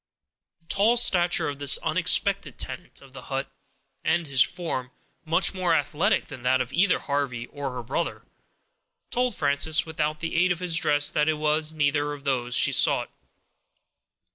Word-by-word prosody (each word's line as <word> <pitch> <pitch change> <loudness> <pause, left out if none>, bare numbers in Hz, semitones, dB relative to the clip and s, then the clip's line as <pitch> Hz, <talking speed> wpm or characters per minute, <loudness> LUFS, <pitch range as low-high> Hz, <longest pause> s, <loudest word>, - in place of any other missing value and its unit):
The - - -33
tall 215 +6 +2
stature 175 -7 +3
of 145 -1 -5
this 140 -1 +4
unexpected - - 0
tenant - - -6
of 135 -1 -18
the 130 - -9
hut, 135 0 -3 0.5
and 165 +1 +1
his 135 -3 +2
form, 160 -9 -1 0.4
much 165 +4 +2
more 180 -3 +1
athletic 150 +1 0
than 125 - -10
that 130 +1 +2
of 125 +1 -4
either 180 +3 +3
Harvey 135 -5 -3
or 140 +1 -6
her 125 -1 -6
brother, 140 +8 -3 0.9
told 250 -2 0
Frances, 145 +4 +1
without 155 -1 -3
the 165 +1 -4
aid 180 +2 +3
of 175 - 0
his 175 -1 -1
dress, 145 -2 +3
that 150 +1 +1
it 155 - +1
was 155 +1 -1
neither 145 0 0
of 145 -1 -10
those 125 -3 -1
she - - +5
sought. - - +2
150 Hz, 165 wpm, -25 LUFS, 140-170 Hz, 0.9 s, she